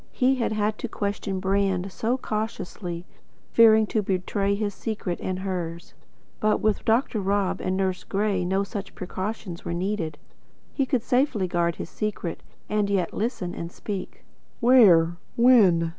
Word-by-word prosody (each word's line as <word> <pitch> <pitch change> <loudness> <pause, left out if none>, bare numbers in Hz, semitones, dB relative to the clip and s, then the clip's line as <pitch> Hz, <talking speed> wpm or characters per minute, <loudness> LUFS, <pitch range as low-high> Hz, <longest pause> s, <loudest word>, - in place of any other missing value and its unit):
He 260 +1 +2
had 230 - 0
had 215 0 0
to - - -3
question 200 -2 -3
Brand 195 -1 0
so 235 +6 -1
cautiously, 200 -6 -4 0.5
fearing 220 -1 +6
to 215 +1 0
betray 195 +1 0
his 205 0 -2
secret 205 -4 -4
and 185 -1 -2
hers; 175 -3 -4 0.5
but 215 0 +2
with 215 -2 0
Dr. 225 0 +2
Rob 195 0 0
and 185 0 -1
Nurse 190 -1 -1
Gray 200 -2 0
no 190 +2 +1
such 200 0 -6
precautions 185 -1 -5
were 170 - -3
needed. 175 -4 -2 0.6
He 275 -2 0
could 255 -4 0
safely 250 -7 +1
guard 170 -1 0
his - - -7
secret, 210 -5 -3 0.3
and 210 -1 0
yet 185 -4 0
listen 215 -5 -2
and 170 0 -6
speak. 200 0 -6 0.3
"Where 190 -10 +6 0.2
when?" 205 -9 +5
200 Hz, 150 wpm, -25 LUFS, 180-220 Hz, 0.6 s, fearing